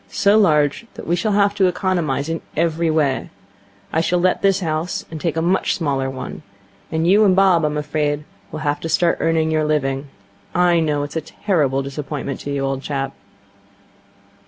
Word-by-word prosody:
So 200 +1 +3
large 155 -1 +3
that - - -8
we 170 - +1
shall 205 +4 0
have 200 0 +3
to 195 -2 +3
economize 175 -6 -1
in 165 0 -3 0.2
every 165 0 +1
way. 150 -4 0 0.6
I 160 - +2
shall 180 +2 +1
let 185 +1 +2
this 195 -1 +2
house 160 +1 -2
and 160 -2 -6
take 165 -2 -1
a 160 - +1
much 185 +3 +1
smaller 140 -5 -1
one. 130 -1 -7 0.5
And 160 +1 0
you 200 +5 +5
and 190 -3 +4
Bob, 185 -4 +4
I'm 150 0 0
afraid, 150 0 -1 0.3
will 155 - -6
have 145 -1 0
to 165 - -5
start 170 +1 +2
earning 160 -1 +1
your 155 -1 +1
living. 140 -2 -1 0.5
I 175 -1 +4
know 150 -3 0
it's 145 +3 -5
a - - -1
terrible 145 -6 0
disappointment 140 0 -5
to 145 - -5
you, 140 -1 -1
old 135 0 -2
chap.' 135 -1 -3
160 Hz, 185 wpm, -20 LUFS, 145-175 Hz, 0.6 s, you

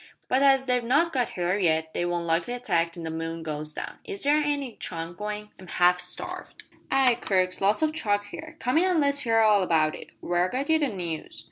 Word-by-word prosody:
But 260 - +2
as 270 -1 +5
they've 250 -2 +1
not 300 +8 +2
got 250 -3 +1
here 180 +3 0
yet, 160 -3 +1
they 175 - -1
won't 175 -1 -2
likely 170 +8 0
attack 170 -9 0
till 170 0 -9
the 160 - -4
moon 165 0 -4
goes 155 -1 -3
down. - - -7
Is 195 - -6
there 290 +1 +4
any 285 -5 -1
chuck 165 0 -5
goin'? 210 +2 -5
I'm 185 - -12
half 180 +1 +3
starved." 180 0 -5 0.3
"Ay, 265 -2 +4
Crux, 185 -1 0
lots 205 +9 +2
o' 310 - +2
chuck 205 -9 -1
here. 315 +9 -9
Come 255 +3 +1
in 360 - +3
an' 365 -3 +2
let's 280 -1 +2
hear 230 -4 +2
all 210 -2 +5
about 160 -4 +2
it. - - -9
Where 175 +1 0
got 275 - -2
ye 320 - +4
the 295 - +2
news?" 175 -8 -5
205 Hz, 225 wpm, -26 LUFS, 170-270 Hz, 0.3 s, as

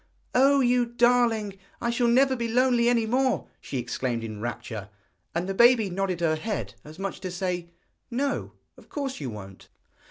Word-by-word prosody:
'Oh! 275 +2 +5
you 245 -1 +3
darling; 235 -4 +2 0.2
I 235 - 0
shall 235 0 +1
never 260 +3 +4
be 235 -2 -2
lonely 240 0 +3
any 235 -2 +2
more!' 255 +3 +1
she 135 - -5
exclaimed 120 -1 -2
in 110 -2 -6
rapture; 110 -3 -5 0.5
and 175 +2 -1
the 195 - -1
baby 235 -2 +5
nodded 185 -1 -1
her 160 -2 +2
head 210 +6 -3
as 155 +2 -12
much 195 0 -4
as - - -15
to 185 - -5
say: 180 -1 -3 0.4
'No, 275 +3 -2 0.2
of - - -18
course 275 -3 -4
you 135 -4 -4
won't!' 95 -3 -10
220 Hz, 180 wpm, -26 LUFS, 170-245 Hz, 0.5 s, Oh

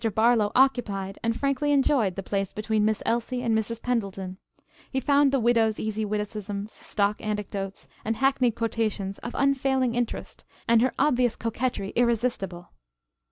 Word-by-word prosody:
Barlow 220 -2 +4
occupied, 210 -7 +1
and 230 0 -1
frankly 275 +1 +1
enjoyed 265 -9 +3
the 195 - -4
place 195 0 -2
between 215 0 0
Miss 215 0 +1
Elsie 240 +2 -1
and 230 -2 +2
Mrs. 220 +1 -1
Pendleton. 195 -6 -2 0.5
He 265 - -1
found 280 +1 +3
the 270 - +2
widow's 230 -2 +2
easy 215 0 -2
witticisms, 210 0 -4
stock 205 0 -1
anecdotes 205 -2 -4 0.2
and 225 +1 -1
hackneyed 260 -2 +2
quotations 220 -4 -2
of 240 - -7
unfailing 265 -2 +2
interest 240 -1 -3 0.2
and 230 -1 +5
her 255 - +1
obvious 250 -4 +2
coquetry 230 -3 -2
irresistible. 230 -7 0
225 Hz, 145 wpm, -26 LUFS, 210-250 Hz, 0.5 s, and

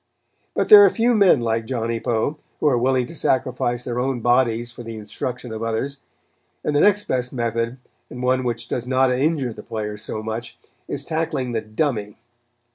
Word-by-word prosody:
But - - 0
there 415 -1 +11
are 400 - +7
few 240 +1 +2
men 195 - +5
like 115 -1 -1
Johnny 115 -2 -2
Poe, 120 +7 -1 0.2
who - - -2
are 140 - +4
willing 130 0 +2
to 145 - -10
sacrifice 125 -4 0
their 120 0 -3
own 130 0 -1
bodies 120 -1 +2
for 120 - -10
the 115 -1 -7
instruction 110 +3 -5
of 110 - -5
others; 115 +5 -2 0.7
and 150 - -1
the - - +4
next 205 +3 +4
best 125 -6 -2
method, 115 0 -2 0.3
and 125 - -7
one 130 0 +2
which 120 -1 -3
does 125 0 -3
not 130 0 +3
injure 135 -1 0
the - - -10
players 105 -1 -5
so 110 -1 -5
much, 110 +2 -5 0.3
is - - -3
tackling 155 -6 -2
the 115 -2 -1
"dummy." 110 -2 -2
125 Hz, 190 wpm, -22 LUFS, 115-130 Hz, 0.7 s, there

